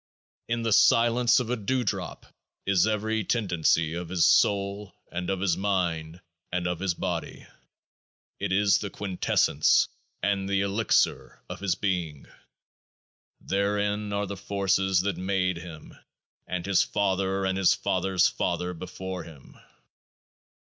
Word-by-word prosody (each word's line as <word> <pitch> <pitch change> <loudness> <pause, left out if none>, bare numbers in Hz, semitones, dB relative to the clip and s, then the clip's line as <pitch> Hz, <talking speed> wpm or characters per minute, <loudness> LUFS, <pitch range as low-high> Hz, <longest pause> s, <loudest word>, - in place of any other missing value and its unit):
In 115 0 -1
the 115 -2 +1
silence 120 +3 +4
of 120 -1 -3
a - - +2
dewdrop 120 +1 -2 0.4
is 100 0 +3
every 110 0 -1
tendency 90 -7 +1
of 85 0 -5
his 90 -2 +2
soul, 100 0 +2 0.2
and 90 +1 -4
of 95 -1 -1
his 95 -4 +2
mind, 90 -4 -2 0.3
and 90 0 -1
of 90 -1 -2
his 95 -2 -1
body; - - -4 0.9
it - - -2
is 100 +1 +3
the 100 - -4
Quintessence 95 -6 +2 0.3
and 100 -1 0
the 100 0 +1
Elixir 100 +3 0
of - - -7
his 95 -2 0
being. 90 -8 -2 1.2
Therein 105 +1 -1
are 100 0 -1
the 100 0 -5
forces 95 -1 +1
that 100 +1 -2
made 90 -1 0
him 85 -2 -10 0.5
and 90 -1 -3
his 100 -2 +3
father 95 -1 0
and 95 0 0
his 95 -2 +4
father's 95 0 +1
father 90 0 -2
before 90 +1 -6
him. 75 -5 -14
95 Hz, 135 wpm, -27 LUFS, 90-100 Hz, 1.2 s, silence